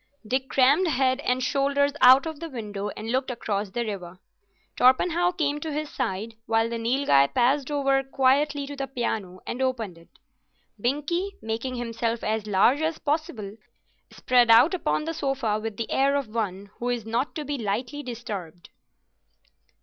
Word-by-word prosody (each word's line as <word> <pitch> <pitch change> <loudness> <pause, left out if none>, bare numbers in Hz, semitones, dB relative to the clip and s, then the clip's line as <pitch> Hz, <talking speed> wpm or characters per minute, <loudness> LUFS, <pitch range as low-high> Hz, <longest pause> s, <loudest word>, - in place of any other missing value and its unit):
Dick 260 +3 -1
crammed 280 +8 +4
head 260 -3 +1
and 255 -2 0
shoulders 280 +1 +1
out 260 +3 +8
of 320 -2 -5
the 330 0 -6
window 210 -6 -5
and 220 +2 -4
looked 260 +1 0
across 210 -4 -3
the 235 +5 -3
river. 185 -4 -6 0.6
Torpenhow 335 +8 +3
came 295 -4 -1
to 315 +1 -5
his 300 0 -3
side, 225 -2 -3
while 225 0 +2
the 230 - -3
Nilghai 230 - +3
passed 260 +3 +2
over 275 -2 +2
quietly 275 +2 +1
to 285 +1 -7
the 275 -1 -4
piano 220 -8 -3
and 250 - -4
opened 230 -9 -2
it. 170 - -20 0.7
Binkie, 300 - -1
making 230 +4 -3
himself 230 -1 -2
as 215 0 -1
large 210 +8 +3
as 315 0 -1
possible, 265 -10 -3 0.5
spread 245 -2 +2
out 240 +10 +7
upon 345 -3 0
the 325 +1 -3
sofa 270 -8 -1
with 220 -1 -5
the 230 - -4
air 275 +1 +2
of 275 -5 -2
one 200 -3 -3
who 245 - -2
is 240 -3 -2
not 235 +5 -2
to 305 - -4
be 285 -1 -3
lightly 235 +7 -3
disturbed. 205 - -7
255 Hz, 165 wpm, -25 LUFS, 220-285 Hz, 0.7 s, out